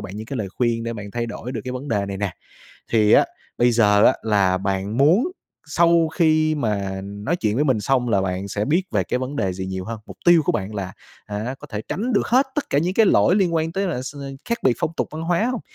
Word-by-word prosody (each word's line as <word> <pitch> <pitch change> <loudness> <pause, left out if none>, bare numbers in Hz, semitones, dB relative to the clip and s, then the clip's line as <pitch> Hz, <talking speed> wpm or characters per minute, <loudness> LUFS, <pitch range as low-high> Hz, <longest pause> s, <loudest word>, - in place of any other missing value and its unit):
bạn 100 0 -8
những 110 +1 -7
cái 135 - -5
lời 105 -5 -3
khuyên 115 +2 -1
để 115 - -3
bạn 105 -2 -7
thay 120 +2 -3
đổi 120 +2 -6
được 115 - -3
cái 125 - -4
vấn 130 +3 -6
đề 100 -5 0
này 100 - -4
nè. 100 -2 -2 0.6
Thì 110 -2 +4
á - - +7 0.3
bây 120 0 +4
giờ 105 -3 +4
á - - +5
là 100 -4 +2
bạn 100 +2 -2
muốn 180 - +4 0.4
sau 170 +2 +3
khi 155 -2 +3
mà 100 -8 -2
nói 100 - -3
chuyện 105 -10 -1
với 140 +6 +1
mình 130 -7 +2
xong 125 +3 +1
là 100 -4 +2
bạn 95 +1 -3
sẽ 105 +1 -2
biết 165 - +2
về 100 -4 +1
cái - - -1
vấn 130 +3 -4
đề 95 -6 0
gì 95 +1 -5
nhiều 95 0 -4
hơn? 115 +1 -5
Mục - - -11
tiêu 175 -2 +6
của 180 - +1
bạn 105 - -3
là, 95 -3 -4 0.3
hả, 105 +5 -4
có - - -11
thể 105 -1 -5
tránh 235 +6 -2
được 205 - +2
hết 260 +3 +3
tất 295 - -3
cả 140 - +2
những 175 +5 0
cái 225 -1 +5
lỗi 185 - +4
liên 185 -5 +2
quan 160 0 0
tới 195 +2 -1
là 150 -9 -2
s 135 - -7 0.3
khác 235 0 -1
biệt 130 - +4
phong 160 - -1
tục - - -1
văn 155 +1 -6
hóa 170 +4 +1
hông? 250 - -3
120 Hz, 265 wpm, -22 LUFS, 100-160 Hz, 0.6 s, á